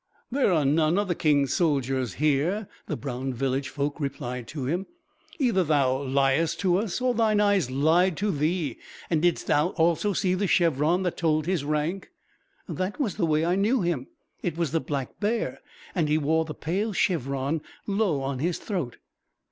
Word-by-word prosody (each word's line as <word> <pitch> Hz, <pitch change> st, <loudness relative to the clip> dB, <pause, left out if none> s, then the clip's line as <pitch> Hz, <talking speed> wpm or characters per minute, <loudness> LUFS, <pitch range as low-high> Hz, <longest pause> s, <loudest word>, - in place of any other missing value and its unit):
"There 270 Hz, -5 st, +2 dB
are 155 Hz, -5 st, +2 dB
none 155 Hz, +4 st, +3 dB
of 205 Hz, 0 st, +1 dB
the 175 Hz, -, +1 dB
King's 145 Hz, -5 st, +2 dB
soldiers 135 Hz, -, 0 dB
here," 155 Hz, +8 st, +1 dB, 0.2 s
the 150 Hz, -, -3 dB
brown 130 Hz, -1 st, -4 dB
village 135 Hz, +2 st, -1 dB
folk 145 Hz, +2 st, -3 dB
replied 125 Hz, -4 st, -4 dB
to 145 Hz, -4 st, -5 dB
him. 175 Hz, +8 st, -1 dB, 0.5 s
"Either 235 Hz, -, +2 dB
thou 140 Hz, -4 st, +2 dB
liest 140 Hz, +3 st, +1 dB
to 180 Hz, -2 st, +3 dB
us, 205 Hz, 0 st, -2 dB
or 250 Hz, 0 st, +1 dB
thine 220 Hz, -3 st, +2 dB
eyes 200 Hz, -9 st, +3 dB
lied 160 Hz, +6 st, +3 dB
to 205 Hz, +1 st, 0 dB
thee. 155 Hz, -3 st, -1 dB, 0.3 s
And 160 Hz, -2 st, +2 dB
didst 175 Hz, 0 st, +1 dB
thou 150 Hz, +3 st, +3 dB
also 170 Hz, +5 st, +2 dB
see 185 Hz, 0 st, +1 dB
the 195 Hz, +2 st, 0 dB
chevron 170 Hz, 0 st, +2 dB
that 180 Hz, -, -2 dB
told 155 Hz, -2 st, +1 dB
his 180 Hz, -4 st, 0 dB
rank?" 155 Hz, +6 st, -2 dB, 0.6 s
"That 185 Hz, +7 st, -3 dB
was 230 Hz, -10 st, -1 dB
the 175 Hz, -6 st, +1 dB
way 155 Hz, +1 st, +2 dB
I 175 Hz, -, +2 dB
knew 210 Hz, +3 st, +2 dB
him. 160 Hz, -7 st, -1 dB, 0.3 s
It 170 Hz, -2 st, -3 dB
was 170 Hz, -4 st, 0 dB
the 165 Hz, -, +2 dB
black 140 Hz, -4 st, -4 dB
bear, 220 Hz, +3 st, -1 dB, 0.3 s
and 160 Hz, -5 st, 0 dB
he 150 Hz, -, +3 dB
wore 160 Hz, +2 st, +1 dB
the 155 Hz, -, -7 dB
pale 200 Hz, +7 st, -2 dB
chevron 140 Hz, -4 st, 0 dB, 0.2 s
low 195 Hz, -8 st, +1 dB
on 135 Hz, -1 st, -3 dB
his 170 Hz, +4 st, 0 dB
throat." 175 Hz, -, -4 dB
160 Hz, 180 wpm, -26 LUFS, 140-185 Hz, 0.6 s, none